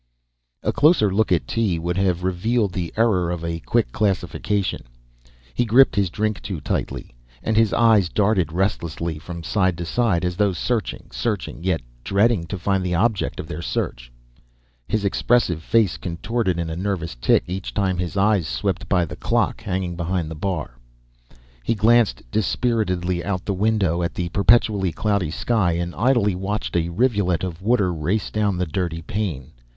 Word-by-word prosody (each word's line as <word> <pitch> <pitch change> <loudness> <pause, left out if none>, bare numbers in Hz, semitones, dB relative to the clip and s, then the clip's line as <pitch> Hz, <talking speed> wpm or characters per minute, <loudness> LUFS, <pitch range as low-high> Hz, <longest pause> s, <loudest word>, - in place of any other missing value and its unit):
A - - 0
closer 145 - +4
look 110 0 +1
at 85 - +2
Tee 110 -7 0
would 85 +1 -2
have 90 -2 +1
revealed 100 +3 0
the 90 -4 -3
error 100 -7 +2
of 85 -1 -3
a 85 0 -3
quick - - 0
classification. 100 - -1 0.7
He - - +1
gripped 120 +3 +5
his 100 -3 +2
drink 105 +3 -2
too 95 -6 -5
tightly, 65 - -3 0.3
and 110 - 0
his 110 -1 +4
eyes 110 -6 +4
darted 100 -6 +1
restlessly 85 -3 -2
from 85 +3 -8
side 95 0 +1
to 85 - -4
side, 95 -3 +1
as 90 0 -2
though 100 -2 +2
searching, 115 +3 -2
searching; 105 -7 -3
yet 90 -5 0 0.2
dreading 100 - +2
to 95 - -4
find 95 +1 0
the 90 -1 -1
object 110 +3 0
of - - -4
their 75 - -5
search. - - -3 0.8
His 110 -2 -1
expressive 100 -4 +2
face 105 +1 +2
contorted 95 +2 -2
in 85 -1 -2
a - - -3
nervous 90 -4 -2
tic - - +2
each 95 +2 -5
time 95 -4 0
his 90 +2 -3
eyes 100 -4 +3
swept - - -2
by 90 -1 +3
the - - -8
clock - - 0
hanging 90 -2 -3
behind 85 -1 -2
the - - -3
bar. 80 -7 -4 0.8
He 115 - 0
glanced 115 +1 +3
dispiritedly 95 -6 0
out 95 -1 -3
the 100 - -1
window 95 -4 +1
at 85 - -2
the 90 -1 -2
perpetually 100 -1 +3
cloudy 100 -1 0
sky 95 +1 +1
and 85 +1 -2
idly 120 -4 +2
watched 95 +3 -3
a 85 0 +1
rivulet 95 - +1
of 90 -2 -4
water 100 -4 +2
race 85 +7 -1
down 105 -3 0
the 90 - 0
dirty 80 0 -3
pane. 85 - -3
95 Hz, 170 wpm, -22 LUFS, 85-105 Hz, 0.8 s, gripped